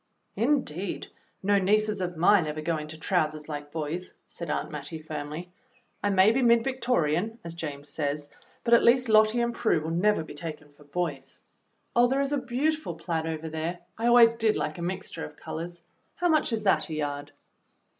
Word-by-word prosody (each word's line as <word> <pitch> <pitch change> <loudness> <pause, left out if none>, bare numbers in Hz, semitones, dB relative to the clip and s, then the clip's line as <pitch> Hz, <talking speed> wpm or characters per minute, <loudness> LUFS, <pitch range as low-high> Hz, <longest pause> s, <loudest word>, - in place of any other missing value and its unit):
"Indeed, 210 - -1 0.3
no 200 +1 +4
nieces 210 +1 +2
of 175 -2 -3
mine 175 0 +5
ever 155 0 -3
go 165 +1 0
into 155 +1 -7
trousers 155 -3 0
like 145 -1 -6
boys," 165 +3 -4
said 170 - -7
Aunt - - -2
Mattie 150 +1 -6
firmly. 155 +2 -6 0.5
"I 205 - +1
may 195 +1 +5
be 260 +4 +1
mid 235 -1 +5
Victorian, 225 - 0
as 170 -1 -6
James 150 -4 -6
says, 145 -1 -3 0.4
but 235 - +2
at 235 - +8
least 250 +1 +4
Lottie 215 +2 +5
and 235 0 0
Prue 220 -8 +2
will 160 +1 -4
never 185 +1 +2
be - - -10
taken 150 -1 -7
for 145 0 -20
boys. 150 -1 -4 0.5
Oh, 240 +1 +6
there 270 +2 +1
is 280 0 -1
a 290 - +1
beautiful 265 - -1
plaid 165 -1 -2
over 160 0 -4
there. 160 +2 -3 0.2
I 230 +2 -1
always 235 -1 +7
did 225 -2 +1
like 155 +3 -2
a - - -5
mixture 185 - -4
of 75 - -8
colors. 170 +1 -7 0.3
How 355 - +1
much 310 -5 +3
is 220 -2 -1
that 195 -4 +2
a 155 - -3
yard.' 145 -1 -3
175 Hz, 190 wpm, -27 LUFS, 155-225 Hz, 0.5 s, at